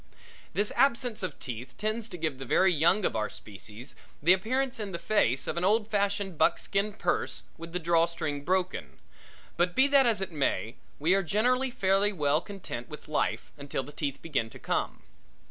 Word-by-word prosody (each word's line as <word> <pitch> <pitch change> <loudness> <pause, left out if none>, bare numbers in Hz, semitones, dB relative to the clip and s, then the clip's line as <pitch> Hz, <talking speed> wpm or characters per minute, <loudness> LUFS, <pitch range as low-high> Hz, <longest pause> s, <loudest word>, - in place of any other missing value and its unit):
This 205 +2 +2
absence 245 -3 +2
of 185 -6 -4
teeth 125 +1 -7
tends 215 +2 -2
to 180 - -6
give 155 -5 -2
the - - -5
very 185 +8 +4
young 170 +6 +3
of - - 0
our 110 -1 0
species 105 +5 -9 0.2
the 170 +5 +6
appearance 255 +7 0
in 205 -3 -4
the - - -1
face 170 - +1
of - - -3
an 170 - 0
old 210 +3 +3
fashioned 200 -4 0
buckskin 200 +5 +2
purse - - -1
with 165 0 -9
the 180 - -2
draw 170 -1 +3
string 150 -4 -3
broken, 185 +2 -1 0.6
but 175 0 +1
be 265 - +6
that 275 -2 +6
as 225 -4 +2
it 190 -1 -3
may, 135 -6 -1 0.2
we 160 +5 +3
are 195 - +4
generally 250 +8 +2
fairly 200 -4 +2
well 150 -4 +1
content 180 -11 -7
with 150 - -9
life 150 - -1
until 140 -1 -3
the 145 - -10
teeth 140 -2 -4
begin 135 -8 -1
to - - -12
come. - - -2
180 Hz, 190 wpm, -29 LUFS, 150-210 Hz, 0.6 s, the